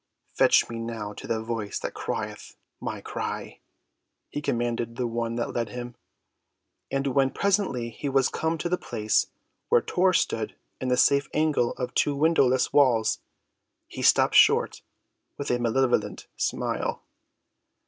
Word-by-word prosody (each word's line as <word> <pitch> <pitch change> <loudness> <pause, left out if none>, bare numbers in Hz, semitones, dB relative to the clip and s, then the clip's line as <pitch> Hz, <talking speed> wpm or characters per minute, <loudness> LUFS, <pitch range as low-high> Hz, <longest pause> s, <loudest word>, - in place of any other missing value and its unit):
"Fetch - - +4
me 115 -1 -6
now 115 -2 -5
to - - -9
the 110 -1 -1
voice 110 -3 -3
that - - -4
crieth - - -5 0.2
my - - -5
cry," - - -5 0.7
he 145 - -4
commanded 120 -2 -2
the 125 - -2
one 115 0 -2
that 120 - -2
led 115 -3 -2
him. 120 +2 -6 1.0
And 135 0 -1
when 135 0 +2
presently 185 - 0
he 140 +5 -4
was 135 -1 +3
come 160 +1 -1
to 175 - -2
the 180 +1 0
place 110 -2 0 0.4
where - - +6
Tor 185 +6 +2
stood 110 -9 0 0.2
in 130 - -3
the 125 0 +2
safe 140 +2 +3
angle 155 -6 +2
of 125 - -5
two 145 - +1
windowless 140 -4 +3
walls, 125 -6 +3 0.7
he - - -7
stopped - - +4
short - - +4 0.6
with 140 -2 -3
a 120 - +1
malevolent 120 +2 0
smile. - - -2
125 Hz, 150 wpm, -26 LUFS, 115-140 Hz, 1.0 s, where